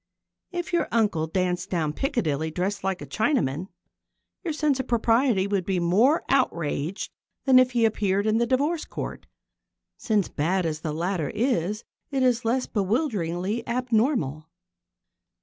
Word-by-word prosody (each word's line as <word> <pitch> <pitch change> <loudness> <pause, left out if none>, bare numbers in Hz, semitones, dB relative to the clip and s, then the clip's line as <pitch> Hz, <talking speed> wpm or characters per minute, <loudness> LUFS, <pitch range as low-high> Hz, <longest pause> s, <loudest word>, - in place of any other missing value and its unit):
If 350 -1 -4
your 345 - +2
uncle 205 -9 +1
danced 180 +2 -1
down 160 -4 -1
Piccadilly 160 - -1
dressed 185 +5 -2
like 190 -1 -2
a - - -6
Chinaman, 185 - 0 0.8
your 340 - -2
sense 300 -3 +1
of 260 - -3
propriety 230 -3 +2
would 200 -2 0
be 185 0 0
more 210 - +3
outraged 170 - 0 0.3
than 260 -2 +7
if 255 0 +3
he 235 -2 +3
appeared 200 -2 +1
in 220 +1 +2
the 235 - +1
Divorce 290 +6 +1
Court, - - -6 0.7
since, 210 -6 +1
bad 175 +5 0
as 155 -2 -2
the 155 -1 -3
latter 170 0 -1
is, 215 -3 0 0.3
it 270 -2 0
is 250 -1 +2
less 250 +3 +1
bewilderingly 205 - -1
abnormal. 235 - 0
205 Hz, 145 wpm, -25 LUFS, 175-250 Hz, 0.8 s, than